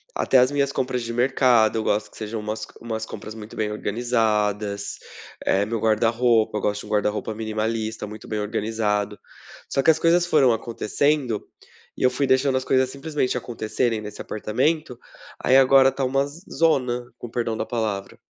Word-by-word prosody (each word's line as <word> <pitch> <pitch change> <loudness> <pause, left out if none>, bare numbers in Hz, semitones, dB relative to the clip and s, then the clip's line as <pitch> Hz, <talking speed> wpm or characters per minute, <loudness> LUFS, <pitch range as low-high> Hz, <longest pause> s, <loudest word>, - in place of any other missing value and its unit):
Até 130 - +3
as 125 +2 +4
minhas 140 -1 +1
compras 125 -3 -2
de 115 - -4
mercado, 120 -3 +3
eu 110 - -1
gosto 105 +1 0
que - - -17
sejam 110 0 -4
umas 110 +1 -4
c - - -6
umas 110 -1 -4
compras 110 - -8
muito 110 0 -10
bem 105 -1 -1
organizadas, 105 -2 -1 0.5
eh, 100 +2 +2
meu 115 +1 -2
guarda-roupa. 115 0 +2
Eu - - -3
gosto 105 0 -1
de - - -11
um - - -12
guarda-roupa 105 +1 -1
minimalista 110 0 -3
muito 105 +1 -10
bem 105 -1 -2
organizado, 105 -1 -1 0.5
só 135 - +1
que - - +7
as 160 - -1
coisas 170 +1 +4
foram 145 -7 +4
acontecendo, 120 +2 -1 0.5
e - - -4
eu 125 - +6
fui 135 +3 -1
deixando 130 0 +3
as 130 - -2
coisas 130 -1 +2
simplesmente 140 -2 -2
acontecerem 115 -1 -2
nesse 105 -1 -8
apartamento. 130 +6 -1 0.5
Aí 130 - +4
agora 135 0 +6
tá 135 - -3
uma 135 +2 +1
z 145 +4 -11
zona, 125 -7 +1
com 120 - -6
o - - -15
perdão 115 -2 -1
da - - -2
palavra. 105 -4 -3
115 Hz, 185 wpm, -23 LUFS, 110-130 Hz, 0.5 s, que